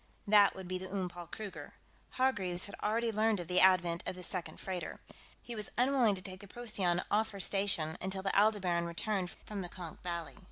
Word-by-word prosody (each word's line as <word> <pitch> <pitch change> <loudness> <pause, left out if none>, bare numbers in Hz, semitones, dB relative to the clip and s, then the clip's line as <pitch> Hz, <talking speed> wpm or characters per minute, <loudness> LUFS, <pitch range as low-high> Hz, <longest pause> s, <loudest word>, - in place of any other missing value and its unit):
That 205 -1 +6
would 190 -1 -7
be 185 0 -2
the 185 0 -7
Oom 190 -2 -1
Paul 175 -1 -9
Kruger. 205 +2 -7 0.4
Hargreaves 190 -9 +2
had 200 - -10
already 225 +2 +1
learned 215 -1 +2
of 175 - -5
the 180 +1 +3
advent 175 -2 +5
of - - -2
the 180 - -8
second 180 0 -4
freighter. 185 -2 -4 0.4
He 240 - -6
was 210 -2 -2
unwilling 250 -4 +4
to 185 - -8
take 185 0 -8
the 200 - -11
Procyon 195 -6 0
off 220 +1 +3
her 200 - -7
station 190 -5 +1
until 190 +1 -2
the 195 - 0
Aldebaran 195 -5 +3
returned 185 +2 -1 0.2
from 205 -2 -4
the 175 - -5
Konk 175 -3 -8
Valley. 170 -2 -4
190 Hz, 205 wpm, -33 LUFS, 180-210 Hz, 0.4 s, That